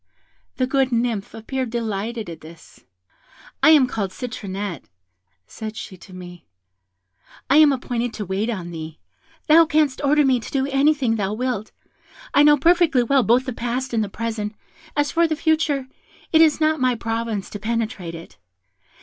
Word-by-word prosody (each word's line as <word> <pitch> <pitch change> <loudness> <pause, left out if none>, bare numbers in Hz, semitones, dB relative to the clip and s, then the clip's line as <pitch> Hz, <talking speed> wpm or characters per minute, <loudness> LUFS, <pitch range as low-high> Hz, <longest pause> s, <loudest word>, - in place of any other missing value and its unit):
The 255 - +1
good 265 0 +1
Nymph 230 -4 -1
appeared 255 +3 -4
delighted 225 -1 -3
at 165 -1 -9
this. 160 +1 -15 0.8
'I - - +6
am 300 -4 +7
called 215 -6 -3
Citronette,' 200 -5 -6 0.6
said 220 - -8
she 190 - -7
to 185 - -16
me; 180 -1 -11 1.0
'I 280 - +6
am 305 -2 +7
appointed 245 -2 -2
to 210 - -5
wait 195 +5 -2
on 180 -7 -4
thee; 160 -1 -7 0.5
thou 325 +1 +6
canst 305 -4 +1
order 295 +1 +4
me 260 -2 +3
to 225 - -9
do 270 -1 0
anything 275 -4 +2
thou 200 -1 -1
wilt 240 -3 -3 0.6
I 285 - +5
know 295 0 +6
perfectly 330 -4 +3
well 270 +3 +3
both 245 +2 +3
the 255 - -4
past 245 +2 -3
and 225 -2 +1
the 205 - -5
present; 215 -1 -4 0.4
as 290 0 +1
for 335 0 +3
the 315 - -1
future, 310 -4 0 0.5
it 320 - +6
is 315 -2 +4
not 310 0 +2
my 255 -1 +2
province 225 -3 -3
to 205 - -6
penetrate 215 -6 -3
it. 165 0 -12
240 Hz, 165 wpm, -22 LUFS, 210-280 Hz, 1.0 s, am